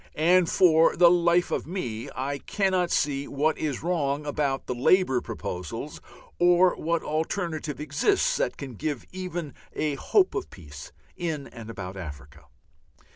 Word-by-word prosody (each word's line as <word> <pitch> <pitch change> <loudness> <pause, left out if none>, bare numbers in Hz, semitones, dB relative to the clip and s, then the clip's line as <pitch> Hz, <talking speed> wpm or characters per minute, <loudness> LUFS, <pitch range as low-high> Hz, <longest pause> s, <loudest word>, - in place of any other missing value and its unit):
And 175 +2 +4
for 165 -3 +5
the 170 -1 +7
life 175 0 +3
of - - -2
me 120 - -4
I 140 +2 -3
cannot 185 -1 0
see 140 -3 0
what 150 +3 +1
is 150 -4 -3
wrong 150 -4 -1
about 145 -2 -1
the - - -2
Labour 130 +1 +3
proposals, 90 -6 -6 0.4
or 175 +1 +5
what 170 +1 -1
alternative 155 -1 -2
exists 375 - +1
that - - -1
can 135 -3 -7
give 145 +2 -4
even 175 -5 -5 0.2
a 150 -1 -1
hope 375 - +2
of 410 -3 -3
peace 75 -5 -11 0.3
in 160 -5 -3
and 115 -2 -10
about 95 -3 -7
Africa. 70 -5 -9
155 Hz, 145 wpm, -26 LUFS, 135-175 Hz, 0.4 s, the